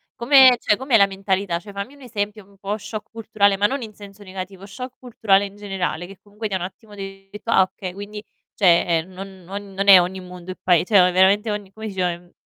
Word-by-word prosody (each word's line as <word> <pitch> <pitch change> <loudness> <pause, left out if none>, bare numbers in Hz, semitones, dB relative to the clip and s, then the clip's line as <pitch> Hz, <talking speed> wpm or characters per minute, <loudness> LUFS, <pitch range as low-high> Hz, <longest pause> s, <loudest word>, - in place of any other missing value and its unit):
come 260 0 +7
cioè 210 - +2
com'è 260 -2 0
la 200 -2 +5
mentalità? 195 -2 -2
Cioè 205 - -12
fammi 200 +7 -6
un 280 - -19
esempio 210 -3 -4
un 200 0 -23
po' 200 +2 -3
shock 210 0 -8
culturale, 215 -3 +1
ma 205 - +2
non 275 +4 0
in 215 -2 -8
senso 205 0 -13
negativo, 190 0 -8
shock 250 +5 -9
culturale 210 -5 +1
in 200 - -10
generale, 190 -4 -3
che 195 0 -13
comunque 210 +2 -6
ti 200 - -7
ha - - +1
un 180 - -5
attimo 205 +3 -10
detto: 195 +2 -9
"Ah, 190 - +6
okay, 185 0 -6
quindi 205 +2 -8 0.3
cioè, 175 -4 +4
ehm, 165 +4 -8
non 190 0 -10
non 200 +2 -8
non 195 +1 -2
è 190 -2 +11
ogni 180 +2 -2
mondo 180 0 -9
è - - -7
pae 175 -2 +3
cioè 205 0 +5
o 180 - +4
veramente 195 +4 +3
ogni" 205 -2 -5
come 220 0 -7
si - - -7
dice 180 -1 +1
ehm 175 +1 -11
200 Hz, 240 wpm, -22 LUFS, 190-210 Hz, 0.3 s, è